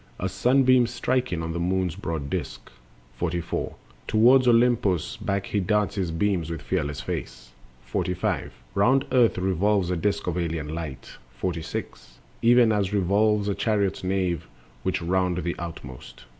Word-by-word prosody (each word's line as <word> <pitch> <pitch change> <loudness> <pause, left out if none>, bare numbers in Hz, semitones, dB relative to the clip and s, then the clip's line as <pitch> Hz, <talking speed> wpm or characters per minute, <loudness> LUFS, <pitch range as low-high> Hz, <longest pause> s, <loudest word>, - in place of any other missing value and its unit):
As 95 0 -2
sunbeam 130 +1 +4
striking 120 -7 -1
on 80 0 -3
the 85 - -3
moon's 90 -1 0
broad 80 -4 -4
disk. - - -5 0.5
44. 85 -1 -2 0.3
Toward 125 +4 +5
Olympos 115 -8 +3
back 100 0 -2
he 105 - -1
darts 105 +2 +1
his 95 -4 -2
beams, 85 -1 0
With 80 -3 -5
fearless 75 -6 -2
face. - - -6 0.3
45. 90 +8 -2 0.2
Round 125 +7 +3
earth 125 -5 +4
revolves 95 +1 +1
a - - +1
disk 100 +4 -1
of 90 0 -1
alien 80 -3 -3
light. 80 -5 -7 0.2
46. 80 -8 -5 0.2
Even 120 -1 +5
as 100 -2 0
revolves 105 +2 +2
a 100 - +1
chariot's 100 -3 0
nave, 90 -3 -1 0.3
which 95 -1 -1
round 90 0 +1
The 85 - -2
outmost. 75 -7 -9
95 Hz, 145 wpm, -25 LUFS, 85-105 Hz, 0.5 s, Toward